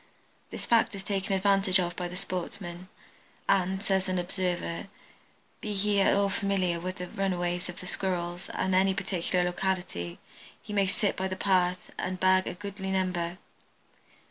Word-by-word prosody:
This - - -6
fact 230 -3 +4
is 195 - -6
taken 195 -1 0
advantage 195 -1 +4
of 175 -1 -1
by 180 - -2
the 175 - -7
sportsmen, 180 -1 -3 0.6
and, 190 +1 +2
says 190 -2 +1
an 185 - +1
observer, 180 0 -2 0.7
be 210 -1 -3
he 200 0 +2
at - - +5
all 200 0 +3
familiar 185 -3 +1
with 185 +2 -4
the 180 - -4
runways 180 -1 -1
of 180 - -7
the - - -8
Squirrels 175 -1 -2
at 190 - 0
any 190 +1 +4
particular 180 -2 0
locality 180 - -1 0.4
he 210 - -8
may 200 -1 +3
sit 200 +2 0
by 190 - -1
the 185 - -3
path 185 -2 +2
and 185 0 -2
bag 185 0 +4
a - - -3
goodly 195 0 -5
number. 180 -2 0
185 Hz, 165 wpm, -29 LUFS, 180-195 Hz, 0.7 s, at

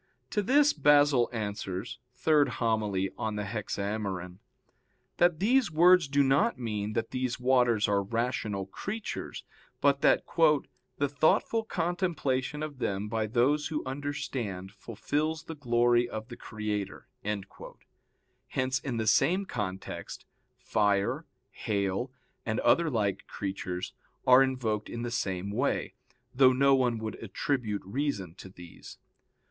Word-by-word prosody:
"To 210 - +1
this 285 +7 +4
Basil 145 -4 +4
answers 105 -2 -4 0.3
(Hom. 120 -9 +2
iii 95 +1 +1
in 110 -1 -2
Hexaem.) 100 -3 -3 0.8
that 175 -2 +3
these 245 +3 +3
words 175 +1 +6
do 140 +1 +3
not 140 +13 +2
mean 105 -3 -3
that 115 0 -2
these 130 -1 -2
waters 125 -4 +3
are 100 -1 +2
rational 110 -2 -2
creatures, 200 - -5 0.4
but 140 0 +3
that - - +4 0.7
"the 145 - +1
thoughtful 155 +10 +2
contemplation 165 -7 -1
of 145 -3 -6
them 100 -2 -2
by 110 -1 -1
those 130 +7 +2
who 155 -1 -3
understand 130 -9 -4
fulfils 145 +10 -3
the 165 - -7
glory 120 -3 +2
of 110 +1 -6
the 120 - -7
Creator." 105 -3 -5 1.4
Hence 130 0 -1
in 130 -3 -4
the 110 - -1
same 180 - +3
context, 95 - -5 0.3
fire, 100 -2 0 0.2
hail, 100 +4 -2 0.3
and 110 0 -1
other 170 -1 +3
like 105 -7 -1
creatures, 95 -2 -4 0.3
are 130 +1 +8
invoked 120 -6 -1
in 115 0 -5
the 120 - -3
same 95 -4 -2
way, 125 +7 -1 0.4
though 130 0 +6
no 140 +2 +4
one 125 -3 +2
would 110 0 -6
attribute 115 -8 -2
reason 100 - -2
to 95 - -9
these. 90 -3 -12
120 Hz, 125 wpm, -29 LUFS, 105-145 Hz, 1.4 s, are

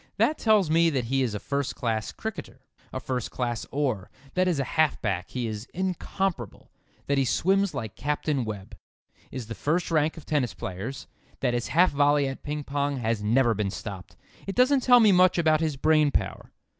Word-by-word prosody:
That 310 - +2
tells 210 -7 +3
me 165 +1 +4
that 135 -5 -1
he 135 +3 0
is 120 -5 -1
a - - -3
first 140 +2 -2
class 110 -3 -2
cricketer; - - -7 0.3
a - - -4
first 125 -3 -3
class 120 -2 -3
oar; 130 -9 -2 0.2
that 185 0 +2
as 175 -4 +1
a 135 - +1
half 155 +3 +1
back 95 -4 -2
he 125 -2 -3
is 110 0 -5
incomparable; 185 - -3 0.3
that 140 -1 +1
he - - +3
swims 195 +8 +1
like 110 -3 -5
Captain 145 -1 -1
Webb; 105 -4 -7 0.5
is 130 -1 -5
in 110 - -15
the - - -3
first 165 +9 -1
rank 155 0 +1
of 160 - -10
tennis 145 -6 0
players; 100 +9 -6 0.4
that 120 - +1
his 120 -1 -1
half 175 +5 +4
volley 145 0 +3
at 135 - -6
ping 150 0 -4
pong 140 0 -1
has 115 -3 -1
never 115 +3 +3
been 105 -2 -1
stopped. 95 -3 -8 0.3
It 195 - -3
doesn't 260 +2 +4
tell 245 -1 +6
me 215 -2 +6
much 185 -1 +5
about 155 -2 +3
his 155 -4 -1
brain 155 +1 +3
power. - - -3
140 Hz, 200 wpm, -26 LUFS, 115-160 Hz, 0.5 s, tell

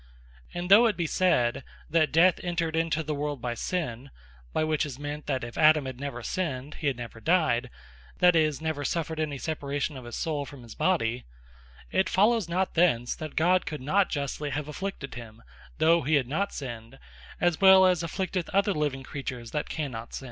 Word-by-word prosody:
And 175 +1 -4
though 225 +4 +8
it 215 - -1
be 170 - 0
said 135 -9 +1 0.2
"That 155 -3 +2
Death 170 +3 +5
entred 170 -2 -1
into 165 -1 0
the 155 0 -3
world 145 -1 -3
by 120 0 -3
sinne," 135 -2 -3 0.4
(by - - 0
which 155 -1 +1
is 140 -4 -5
meant 145 +1 -6
that 130 -3 -1
if 120 0 -6
Adam 155 -2 +5
had 130 -1 -6
never 140 -4 -5
sinned, 150 -5 -3
he 150 - 0
had 135 -3 0
never 115 -1 -8
dyed, 135 -6 +2 0.5
that 180 -1 +5
is, 155 -3 +2
never 160 -2 -3
suffered 160 +2 -2
any 150 -3 -2
separation 145 0 -3
of 130 -2 -9
his 120 - -7
soule 155 -4 -2
from 140 -2 -11
his 115 -2 -10
body,) 125 -10 0 0.7
it 190 0 +2
follows 215 -2 +3
not 185 +2 0
thence, 125 -9 +2
that 155 -2 -7
God 180 +3 +3
could 155 -2 -4
not 185 +9 +2
justly 145 0 -3
have 145 +2 -3
Afflicted 150 -2 -5
him, 115 -2 -10 0.3
though 165 +1 +4
he 150 +4 +1
had 135 -4 +1
not 195 +9 -1
Sinned, 120 -2 -7 0.4
as 175 0 +1
well 190 -1 +8
as 180 -2 +3
he 165 - -3
afflicteth 185 +1 -3
other 200 +1 +2
living 145 -3 -2
creatures, 125 -4 -6
that 150 - -3
cannot 125 -7 -5
sinne. - - -4
150 Hz, 200 wpm, -27 LUFS, 135-175 Hz, 0.7 s, though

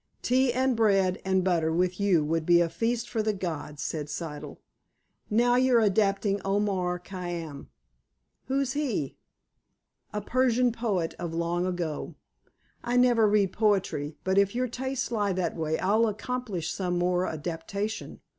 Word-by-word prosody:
"Tea 255 +1 +3
and 260 +1 +1
bread 195 -4 +2
and 190 -1 +1
butter 170 -3 +1
with 180 +2 0
you 185 -7 +3
would 165 +1 0
be 170 +1 +5
a 170 -1 +2
feast 225 +8 -1
for 225 - -1
the 215 0 0
gods," 160 -5 -5
said 150 -2 -3
Siddle. 150 -1 -6 0.7
"Now 245 +3 +3
you're 255 -2 +4
adapting 200 -1 +2
Omar 195 -3 0
Khayyam." 175 -5 -6 0.8
"Who's 270 0 0
he?" 250 - -2 0.9
"A 210 - -2
Persian 250 +2 +2
poet 210 -8 -1
of 170 -2 -4
long 170 +2 0
ago." 175 -4 -3 0.7
"I 240 +1 0
never 240 -3 +5
read 205 -2 +2
poetry. 190 -9 0
But, 190 +1 +3
if 200 +2 +2
your 255 +1 +1
tastes 260 +1 -3
lie 205 -4 +1
that 180 -2 -1
way, 160 -1 -1
I'll 215 +4 +2
accomplish 215 -5 -3
some 180 -2 -1
more 180 +1 +1
adaptation." 175 +7 -4
195 Hz, 145 wpm, -27 LUFS, 175-230 Hz, 0.9 s, be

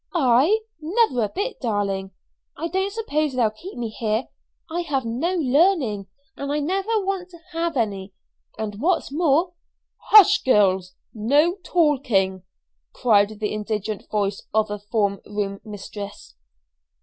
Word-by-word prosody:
"I? 290 - +4 0.2
Never 340 - +2
a - - -5
bit, 405 - -4
darling. 200 -5 -1 0.5
I 330 +3 -3
don't 380 +3 -1
suppose 310 -10 -1
they'll 235 -4 +2
keep 350 - -10
me 235 -2 -3
here. 220 +2 -2 0.4
I 335 +2 -3
have 280 -7 -2
no 265 +11 -1
learning, 280 - +2 0.3
and 280 0 -4
I 295 - 0
never 390 +7 0
want 380 -2 -2
to 345 - -13
have 335 -2 -2
any, 200 -4 -2 0.5
and 215 -1 -5
what's 340 -2 +1
more 330 +3 +2 0.2
" - - -57
"Hush, 410 -1 +8
girls! 190 -6 +2 0.2
No 285 +10 +3
talking," 250 - +1 0.5
called 210 -2 +2
the 210 -1 -2
indignant 215 0 -4
voice 200 -2 -1
of 215 -1 +2
a 210 - -3
form 205 -1 -1
room 205 -1 -4
mistress. 205 -1 -8
250 Hz, 140 wpm, -23 LUFS, 210-340 Hz, 0.5 s, Hush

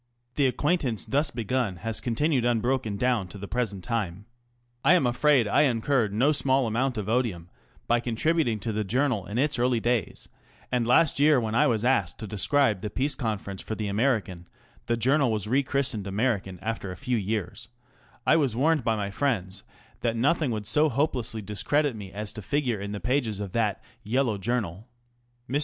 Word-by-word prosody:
The 140 0 +2
acquaintance 130 - 0
thus 145 +2 +1
begun 120 -4 -1
has 115 +5 -3
continued 130 +2 +1
un 120 -1 +2
broken 120 -3 -1
down 120 -5 +1
to 95 - -9
the 100 +1 -7
present 105 -6 -2
time. 105 -5 -3 0.6
I 165 +6 +6
am 170 - +3
afraid 125 0 +3
I - - +3
incurred 120 -4 +2
no 125 +9 +3
small 135 -3 +2
amount 120 +3 0
of 105 -2 -3
odium 110 -8 -1 0.3
by 120 0 +2
contributing 120 +1 0
to 115 - -2
the 110 0 -1
Journal 120 -1 0
in 105 - -4
its 145 0 +1
early 125 -1 +2
days, 120 -3 -1 0.4
and 120 -2 +1
last 140 +4 +4
year 145 -1 +5
when 110 -2 -2
I 145 +6 +4
was 115 -3 0
asked 120 -9 +1
to 110 - -7
describe 105 +1 +1
the 105 - -3
Peace 135 +7 -1
Conference 105 -5 -4
for 110 - -5
the 105 -1 -3
American 100 -6 0 0.4
(the 115 0 +1
Journal 135 +2 +2
was 105 -3 -1
re 130 +5 +3
christened 130 -7 -1
American 100 -3 -1
after 110 -4 -3
a 90 - -8
few 125 -3 -1
years), 110 +2 -3 0.6
I 160 - +5
was 135 -8 +1
warned 150 +2 +2
by 115 -1 +1
my 100 -2 -3
friends 100 -7 -1 0.4
that 115 -1 -1
nothing 145 +5 +2
would 110 -3 -3
so 150 +7 +3
hopelessly 125 -5 -1
discredit 130 +7 0
me 100 -3 -8
as 105 +1 -5
to 110 - -7
figure 125 -2 -1
in 100 0 -5
the 105 - -4
pages 115 -1 -1
of 100 -2 -5
that 110 -2 -1
" - - -39
Yellow 115 -1 0
Journal." 105 -2 -2 0.6
Mr. 140 +3 0
115 Hz, 190 wpm, -26 LUFS, 105-135 Hz, 0.6 s, I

